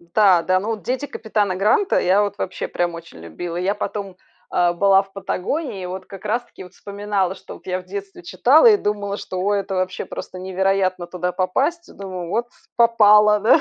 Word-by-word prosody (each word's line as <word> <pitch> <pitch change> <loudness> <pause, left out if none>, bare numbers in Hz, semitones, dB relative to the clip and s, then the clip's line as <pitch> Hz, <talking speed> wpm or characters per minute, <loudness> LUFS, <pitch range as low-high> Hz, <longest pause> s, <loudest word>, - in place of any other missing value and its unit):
Да, 195 -5 +5
да. 185 +2 +2
Ну 210 - -5
вот 215 -5 -4
"Дети 260 - -2
капитана 210 -6 -1
Гранта"- 215 - +2
я 190 +3 +3
вот 205 -1 -3
вообще 185 - -4
прям 175 -1 -1
очень 165 - -11
любила. 165 - -6
Я 190 +3 0
потом, 200 -2 -5 0.4
э, 175 -1 +3
была 195 +2 +4
в 195 0 -20
Патагонии, 200 - -3
и - - -4
вот 185 +1 -7
как 195 0 -11
раз-таки 235 -2 -3
вот 180 - -14
вспоминала, 200 -2 -2
что - - -11
вот - - -16
я 185 0 -2
в 180 - -16
детстве 195 -1 -8
читала 250 - +4
и 420 - +6
думала, 205 - -2
что: 185 - -7
"О, 205 +2 +1
это 195 -1 -2
вообще 185 0 -2
просто 185 - -8
невероятно 185 -1 0
туда 180 0 -3
попасть!" 270 - -1
Думаю: 185 -3 -6
"Вот 235 +4 0 0.3
попала, 210 -3 +5
да!" 240 +9 +5
195 Hz, 200 wpm, -21 LUFS, 185-210 Hz, 0.4 s, и